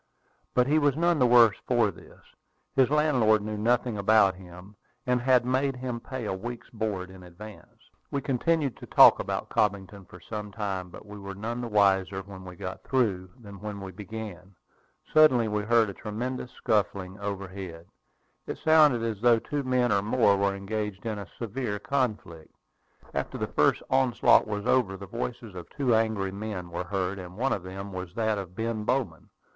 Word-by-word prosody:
But 125 - +4
he 150 +4 +3
was 145 -3 +2
none 170 -1 +2
the 125 - +5
worse 120 -3 +6
for - - +3
this. - - -17 0.5
His 130 -2 +4
landlord 130 -8 +3
knew 105 0 -4
nothing 115 0 0
about 100 -1 +4
him, 90 +2 -13 0.3
and 125 -1 +1
had 125 -1 +3
made 130 +2 0
him 125 -2 -4
pay 130 0 -6
a 105 - -2
week's 120 +5 -7
board 100 -5 -3
in 95 0 -13
advance. 95 +4 -13 0.2
We 140 - -1
continued 140 +1 0
to - - -11
talk - - +7
about - - -3
Cobbington 100 -1 -1
for 90 - -13
some 105 +3 -7
time; 100 -4 -4
but 90 - -12
we 105 0 -10
were 100 0 -7
none 115 +4 -4
the 120 - -4
wiser 95 -2 +2
when 95 -1 -11
we 90 -1 -9
got 90 +2 -7
through 100 -9 0
than 100 -4 -11
when 105 0 -6
we 95 -1 -7
began. 100 -2 -8 0.6
Suddenly 140 -7 +6
we 105 -1 -1
heard 115 +1 +3
a 100 - -6
tremendous 125 +6 -5
scuffling 100 -2 -1
overhead. 95 -4 -6 0.6
It - - -4
sounded 150 -7 +4
as 110 -3 -3
though 120 -1 +5
two 145 +5 -3
men 125 -2 +1
or 100 -1 +3
more 105 -1 +3
were 100 0 0
engaged 105 +1 -4
in 110 -2 -3
a 100 - -8
severe 115 -2 -3
conflict. 105 - -3 0.6
After - - -3
the - - -1
first - - +1
onslaught 130 -5 +4
was 105 -1 -4
over, 100 -7 +2
the 100 - -9
voices 115 +1 -5
of 90 -2 -9
two 135 -5 0
angry 110 -4 +1
men 100 -3 -6
were 85 +1 -4
heard; 95 +1 -2
and 90 0 -10
one 135 +4 +1
of 100 - -3
them 95 +2 -8
was 90 -1 -7
that 110 -2 0
of 90 -2 -8
Ben 115 0 -2
Bowman. 115 -9 -2
105 Hz, 185 wpm, -27 LUFS, 95-120 Hz, 0.6 s, talk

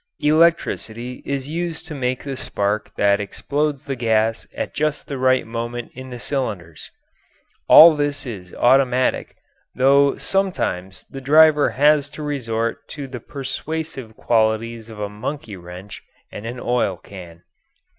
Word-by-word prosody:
Electricity 150 -6 +1
is 140 -1 -2
used 165 +1 -4
to 160 - -7
make 130 -2 -2
the 140 -1 -4
spark 105 -4 -2
that 100 0 +3
explodes 145 +7 -2
the 135 - -4
gas 115 -1 0
at - - -4
just 150 -1 -1
the 140 -2 -5
right 130 0 +3
moment 120 +1 -5
in 130 +1 -9
the 125 - -7
cylinders. 105 - -4 0.8
All 160 0 +10
this 145 -1 -2
is 95 -8 -8
automatic, 130 0 +2 0.4
though 140 +2 +4
sometimes 95 - -2
the 135 - -9
driver 150 +1 +5
has 145 +1 +3
to 155 - -5
resort 115 -6 -3
to 145 -2 -7
the 130 -2 -7
persuasive 140 -2 -6
qualities 115 0 0
of 110 -2 -10
a 105 - -2
monkey 105 +3 -6
wrench 90 +3 -10 0.3
and 105 - -7
an 120 +2 -6
oil 120 -7 0
can. 90 -3 -12
130 Hz, 140 wpm, -21 LUFS, 110-145 Hz, 0.8 s, All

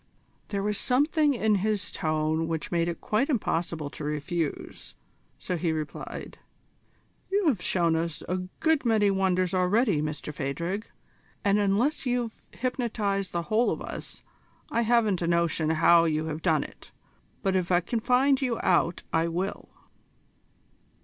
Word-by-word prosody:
There 200 -1 -2
was 210 0 0
something 290 +3 +2
in 220 -2 +2
his 210 -1 -1
tone 155 +1 0
which 160 -2 -3
made 170 -1 +1
it 170 - -4
quite 225 +8 0
impossible 165 - -1
to 155 - -8
refuse, 150 +2 -4 0.4
so 180 - -3
he 170 -1 0
replied: 155 -2 -6 0.9
"You 400 0 +1
have 220 -10 0
shown 170 -3 +2
us 165 -1 -2
a 185 - 0 0.2
good 320 -3 +3
many 215 -4 +3
wonders 185 -2 +1
already, 185 - +2
Mr 150 0 -4
Phadrig, 170 +9 -3 0.6
and 200 +1 +4
unless 225 +9 +1
you've 245 -2 0 0.2
hypnotised 220 -6 -2
the 170 0 -2
whole 220 +6 +2
of - - -2
us, - - -7 0.5
I 235 - +2
haven't 225 -5 +2
a 170 - 0
notion 170 -2 +1
how 165 +1 +5
you 155 -1 0
have 160 0 -4
done 160 -5 +2
it; - - -13 0.5
but 190 -1 +1
if 185 -1 0
I 175 - +5
can 225 +7 -2
find 260 +4 +3
you 245 -4 0
out 175 -1 +2
I 165 +1 +2
will." 180 +4 -3
185 Hz, 150 wpm, -27 LUFS, 165-225 Hz, 0.9 s, how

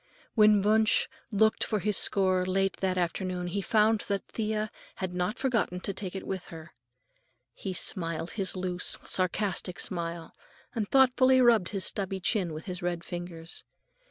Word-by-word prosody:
When 210 -3 +5
Wunsch 220 +1 +3 0.2
looked 220 +1 +3
for 215 - 0
his 210 +1 0
score 185 -2 +3
late 195 +1 0
that 185 -1 -1
afternoon, 180 +1 -2
he 190 +3 -2
found 215 +2 +3
that 200 -1 -2
Thea 215 -1 -2 0.2
had 185 -2 -4
not 180 +5 -1
forgotten 230 -9 0
to 200 - -2
take 190 -1 -6
it 190 - -5
with 190 -2 -4
her. 160 -1 -11 0.8
He 190 - -5
smiled 165 -2 0
his 195 -3 -3
loose, 180 -1 -1
sarcastic 185 0 -1
smile, 170 -2 -4 0.4
and 215 -4 -2
thoughtfully 260 -1 +5
rubbed 235 -7 +4
his 195 -2 -1
stubbly 195 -1 -1
chin 185 -2 +1
with 155 +1 -7
his 180 -3 -5
red 175 -1 -2
fingers. 175 -1 -6
190 Hz, 155 wpm, -29 LUFS, 180-215 Hz, 0.8 s, When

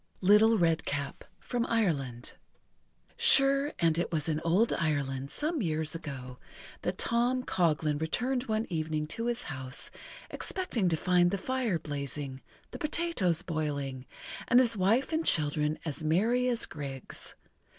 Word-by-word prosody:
LITTLE 210 +4 +6
REDCAP 160 -5 0 0.2
From 245 -2 -2
Ireland 140 - -1 0.9
Sure 275 +1 +4
and 165 -1 +2
it 175 - -1
was 155 -2 -1
in 155 -1 0
old 185 +8 +3
Ireland, 140 -4 -1
some 305 - -1
years 160 -3 -1
ago, 135 -6 -7 0.4
that 180 +1 -2
Tom 245 +2 +1
Coghlan 155 - +1
returned 245 +10 0
one 220 -1 0
evening 155 -2 -1
to 230 +8 -3
his 240 0 -1
house, 130 -2 -6 0.4
expecting 245 - -1
to 160 - +1
find 175 +1 +3
the 200 - -1
fire 245 -2 0
blazing, 140 -3 -5 0.3
the - - -7
potatoes 295 - 0
boiling, 145 -6 -3 0.4
and 240 - +6
his 235 -3 +3
wife 225 - +2
and 320 +1 +1
children 150 - +1
as 155 0 -4
merry 225 +11 +2
as 240 -2 -1
grigs. 135 -3 -8
170 Hz, 140 wpm, -30 LUFS, 150-235 Hz, 0.9 s, LITTLE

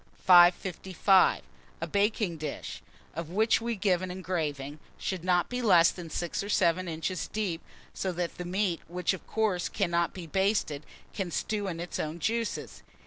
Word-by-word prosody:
555. 185 +1 +5 0.4
A - - -2
BAKING 205 -3 0
DISH, 155 0 -6 0.3
of 165 0 -5
which 220 +5 +2
we 235 0 -2
give 185 -3 +1
an 185 - -4
engraving, 155 -6 -3 0.2
should 185 -3 -3
not 180 -1 +2
be 250 0 -3
less 175 -7 +6
than 175 -3 -9
6 175 +2 -2
or 200 - -6
7 180 -1 +2
inches 165 +3 -3
deep; 195 -6 -2 0.3
so 190 - -2
that 175 -1 -4
the - - -2
meat, 185 -1 0
which 180 +2 -1
of 190 - -9
course 210 -5 0
cannot 170 -4 0
be 180 -3 -8
basted, 190 -4 0 0.3
can 190 -3 -3
stew 205 +4 -2
in 170 -3 -4
its 175 0 -5
own 155 +2 -3
juices. 230 +6 -2
180 Hz, 165 wpm, -29 LUFS, 170-200 Hz, 0.4 s, less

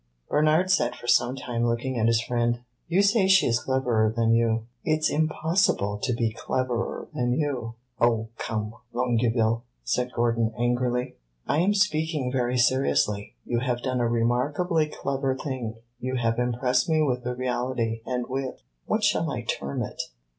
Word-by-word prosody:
Bernard 155 +5 +3
sat 120 -10 +2
for - - -12
some 120 +1 +3
time 120 -3 -3
looking 120 +3 0
at 110 - +3
his 115 -1 +3
friend. 120 0 0 0.3
"You 185 +4 +3
say 200 -1 +4
she 190 -1 +6
is 115 -1 +2
cleverer 125 -5 +1
than 115 0 +2
you. 115 -1 +2 0.2
It 155 0 0
's - - +3
impossible 155 - +1
to - - 0
be 115 -2 0
cleverer 125 0 -2
than 120 0 0
you." 125 -5 -2 0.2
"Oh, 115 -1 +2
come, 110 -1 -3 0.2
Longueville!" 115 -1 +1 0.2
said 125 - -1
Gordon, 115 -2 0
angrily. 125 +1 0 0.3
"I 150 - +1
am 195 +4 +3
speaking 160 -8 +1
very 125 -1 0
seriously. 120 -5 +1
You 120 - 0
have 120 0 -2
done 130 -1 -1
a 120 - +2
remarkably 145 +8 +1
clever 135 -2 -2
thing. 130 -5 -4 0.2
You 130 +1 -3
have 115 -1 0
impressed 125 +2 +1
me 155 -1 +3
with 125 -4 0
the 125 0 -3
reality, 125 -2 -1
and 125 0 -2
with 130 0 -4 0.3
what - - 0
shall - - +2
I - - -3
term 70 0 -2
it? - - -4
125 Hz, 165 wpm, -26 LUFS, 115-135 Hz, 0.3 s, she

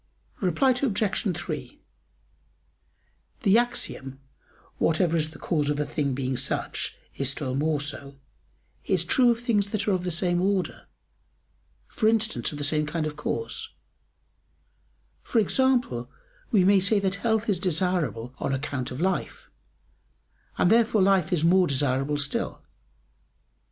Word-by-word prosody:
Reply 195 - +2
Obj. 220 -6 0 0.2
3: 175 - -6 1.6
The 205 0 +5
axiom, 135 - -4 0.6
"whatever 165 +1 +2
is 155 -1 +1
the 155 - -13
cause 150 -4 -1
of 145 0 -1
a 150 - 0
thing 145 -2 -1
being 130 -1 -2
such, 130 - -2 0.2
is 135 -1 +2
still 140 -2 -3
more 150 +2 0
so," 140 -1 -5 0.7
is 180 -3 +1
true 250 +6 +4
of 235 0 +1
things 210 -5 +1
that 215 0 -2
are - - +3
of 185 -2 0
the 180 - -2
same 175 +1 +1
order, 195 -1 -1 1.0
for 215 - 0
instance, 220 -3 +1
of 150 - -7
the 145 - -3
same 150 +1 +2
kind 155 +1 -2
of 150 -1 -4
cause; 450 - -4 1.5
for - - -3
example, 225 - +1 0.4
we 200 -5 +4
may 195 +1 +5
say 200 +3 +2
that 195 0 -1
health 220 +1 0
is 200 -5 +1
desirable 160 - 0
on 135 - -1
account 130 -2 -3
of 125 - -7
life, 190 - -2 1.1
and 180 - +3
therefore 220 -3 +4
life 190 -2 +3
is 170 -4 +1
more 180 +2 +5
desirable 135 +1 0
still. 145 -1 -2
175 Hz, 140 wpm, -26 LUFS, 145-205 Hz, 1.6 s, The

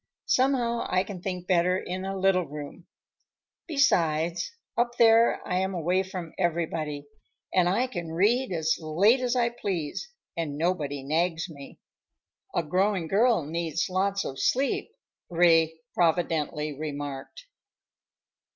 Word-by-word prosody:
Somehow 250 -3 +1
I 185 0 +2
can 195 -2 -8
think 180 -2 -4
better 180 0 +2
in 185 0 -4
a 195 0 -3
little 185 -2 +2
room. 150 +4 -9 0.8
Besides, 170 - +1 0.2
up 240 0 0
there 230 0 +5
I 180 - 0
am 190 0 -1
away 175 +3 +1
from 185 -4 -6
everybody, 160 -4 -1 0.5
and 180 -1 +4
I 220 +8 +2
can 175 -10 -5
read 215 +9 +2
as 160 -2 +1
late 180 +10 +3
as 250 0 0
I 240 -1 +2
please 200 - -4 0.3
and 155 -4 -3
nobody 150 -5 -1
nags 165 +4 0
me." 140 -3 -11 0.8
"A 170 - +2
growing 185 +2 +1
girl 215 - +3
needs 165 +1 -2
lots 200 +2 0
of 135 - -5
sleep," 270 +2 +1 0.4
Ray 165 -2 +3
providently 160 -3 0
remarked. 145 - -6
175 Hz, 130 wpm, -27 LUFS, 160-200 Hz, 0.8 s, there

